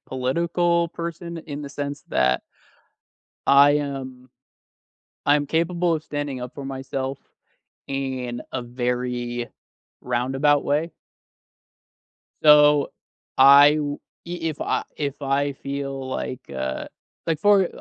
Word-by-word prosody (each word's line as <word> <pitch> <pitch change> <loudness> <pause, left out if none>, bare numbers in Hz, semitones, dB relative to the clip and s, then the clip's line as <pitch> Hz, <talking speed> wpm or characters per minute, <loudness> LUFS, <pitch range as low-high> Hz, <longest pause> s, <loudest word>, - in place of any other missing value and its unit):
political 170 +6 0
person 170 0 -6
in 150 -2 -7
the 140 - -6
sense 145 +1 -5
that 65 0 +2 1.1
I 140 +1 +7
am 135 -3 -3 1.0
I'm 145 0 +3
capable 170 +2 +1
of 155 -1 -2
standing 145 -3 -4
up 125 - -7
for 140 - -7
myself 135 0 -4 0.7
in 130 -3 -3
a 130 - -3
very 120 -1 -3 0.5
roundabout 135 +4 +1
way. 155 +4 0 1.5
So, 150 -1 +6 0.5
I 140 +2 +8
w 145 -1 -2 0.3
e 175 +1 -4
if 150 - -7
I - - 0
if 145 -1 -4
I 140 +1 0
feel 140 -1 -5
like, 130 -1 -4 0.2
uh, 65 0 -3 0.4
like 160 -2 0
for 205 +1 +5
I 175 - -1
140 Hz, 115 wpm, -23 LUFS, 130-150 Hz, 1.5 s, I